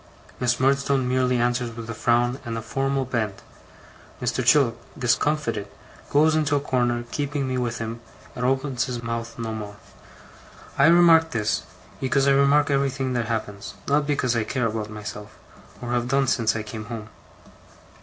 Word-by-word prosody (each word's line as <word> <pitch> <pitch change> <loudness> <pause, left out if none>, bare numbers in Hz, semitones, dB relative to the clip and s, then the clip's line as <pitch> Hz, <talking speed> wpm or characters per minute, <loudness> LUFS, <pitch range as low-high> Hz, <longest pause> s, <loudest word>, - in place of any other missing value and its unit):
Miss 125 -1 +1
Murdstone 135 0 +2
merely 125 0 +2
answers 120 -1 0
with 115 -1 -7
a 115 - -4
frown 120 +3 +1
and 115 -3 -4
a - - -3
formal 135 +2 -1
bend: 110 -5 -2 0.8
Mr. - - -1
Chillip, 135 -6 +4 0.2
discomfited, 125 -3 0 0.4
goes 155 +2 +4
into 150 -2 +2
a - - +3
corner, 120 -3 0
keeping 145 -2 -2
me 130 - -2
with 120 -2 -2
him, 115 +1 -5 0.4
and 125 - -4
opens 130 -1 0
his 125 -2 -5
mouth 115 0 -4
no 115 -1 -4
more. 105 -2 -6 1.0
I 140 - +5
remark 165 -1 +6
this, 110 -6 0 0.4
because 135 +1 +1
I - - +5
remark 140 +1 +4
everything 135 -1 0
that 120 -2 -1
happens, 105 -3 -4
not 145 +1 +2
because 130 -4 +1
I 115 - +1
care 125 +2 -1
about 110 -1 -2
myself, 105 0 -8 0.5
or 120 - -4
have 120 0 0
done 135 +1 +2
since 115 -3 +1
I 110 - -2
came 110 0 -7
home. 110 -1 -7
125 Hz, 165 wpm, -24 LUFS, 115-140 Hz, 1.0 s, remark